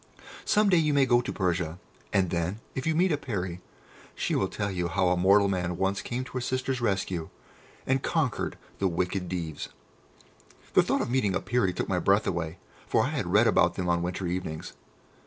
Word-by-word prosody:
Some 210 -1 +3
day 180 - +5
you 155 -3 +2
may 140 -1 +5
go 120 -1 +4
to - - -4
Persia, 90 -3 -1 0.3
and 95 -4 +2
then, 85 +4 -1
if 130 +3 -3
you 160 - +2
meet 180 +2 +3
a 150 - +2
Peri, 95 -10 -4 0.5
she - - -1
will - - +2
tell 100 -1 -3
you 90 -2 -1
how 90 +1 +1
a 90 - +3
mortal 100 +3 +5
man 90 -3 -1
once 95 +1 0
came 125 +2 -3
to 130 - -11
her 125 - -3
sisters' 130 0 -1
rescue, 95 -6 -1 0.6
and 135 0 +1
conquered 155 -5 -1 0.2
the 95 - +2
wicked 90 +1 -1
Deevs." 85 -4 -4 1.1
The - - +7
thought - - 0
of - - -2
meeting 105 -8 +1
a - - +2
Peri 120 -6 +1
took - - -3
my 90 - 0
breath 100 +4 +3
away, 85 -1 -2 0.3
for - - +3
I - - 0
had - - -2
read - - +5
about - - +3
them 90 - -2
on 85 0 +2
winter 90 +2 -3
evenings. 85 -3 -4
95 Hz, 205 wpm, -28 LUFS, 90-125 Hz, 1.1 s, The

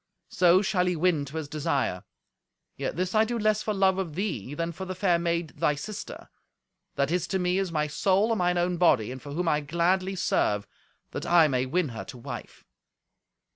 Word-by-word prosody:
So 180 +2 +4
shall 180 -2 +1
he 180 - +1
win 160 -3 +1
to 145 +4 -7
his 155 -2 -4
desire. 145 - -1 0.7
Yet - - -3
this 185 +2 -2
I 215 0 +5
do 235 +2 -2
less 215 -1 +2
for 215 - -2
love 190 -2 +2
of 170 -6 -4
thee 160 - -3
than 165 +2 -2
for 180 +3 -7
the 185 0 -5
fair 180 -2 +2
maid, 170 -1 -1
thy 150 -1 +2
sister, 200 +8 -8 0.6
that 140 +2 0
is 175 -1 0
to 190 - 0
me 180 +1 +1
as 190 -3 -2
my 150 -2 0
soul 195 +8 +1
and 225 - 0
mine 180 0 +2
own 175 0 0
body, 130 -10 +3
and 130 0 -8
for 145 -1 -8
whom 175 +3 -2
I 150 -2 +3
gladly 180 +5 0
serve, 105 - +1 0.5
that - - -5
I 170 -2 +6
may 130 -2 0
win 165 +2 0
her 115 -2 -6
to 130 - -10
wife." 120 - -9
175 Hz, 210 wpm, -27 LUFS, 150-185 Hz, 0.7 s, I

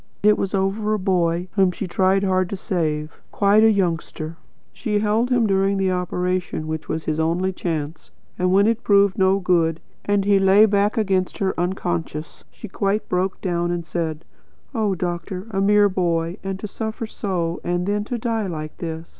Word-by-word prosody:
It 210 0 +6
was 195 +1 -2
over 205 +3 0
a - - -1
boy 180 -2 0
whom 195 -3 +3
she 180 +3 -4
tried 190 +2 +2
hard 185 -2 +1
to 200 - -4
save 155 -5 -2
quite 205 +2 +4
a 225 - +7
youngster. 165 -5 -1 0.4
She 220 -4 -4
had 205 0 +2
held 220 +4 +1
him 245 -3 +3
during 195 -1 +2
the 190 -1 +1
operation 180 -2 -2
which 160 0 -5
was 160 0 -2
his 155 0 -2
only 175 +4 0
chance; 160 -3 -4 0.3
and 180 0 +2
when 200 +2 +5
it 230 +1 +1
proved 200 -2 +3
no 190 +1 +4
good, 170 -4 +1 0.2
and 205 -1 +1
he 200 -1 +4
lay 195 +2 +6
back 205 +2 +1
against 190 -4 0
her 190 -1 0
unconscious, 155 - -3
she - - -10
quite 200 +2 -1
broke 185 +1 -1
down 175 -1 -1
and 175 -1 -2
said: 165 -2 -3 0.5
'Oh, 215 -5 0
doctor, 180 +2 -4
a 195 -1 0
mere 205 +1 +5
boy 170 -1 -1
and 195 -1 -4
to 210 - -4
suffer 220 +2 -4
so, 180 -6 -3
and 175 0 -1
then 205 +1 0
die 230 -3 -1
like 155 -3 -6
this!' 165 -1 -6
190 Hz, 185 wpm, -22 LUFS, 170-200 Hz, 0.5 s, a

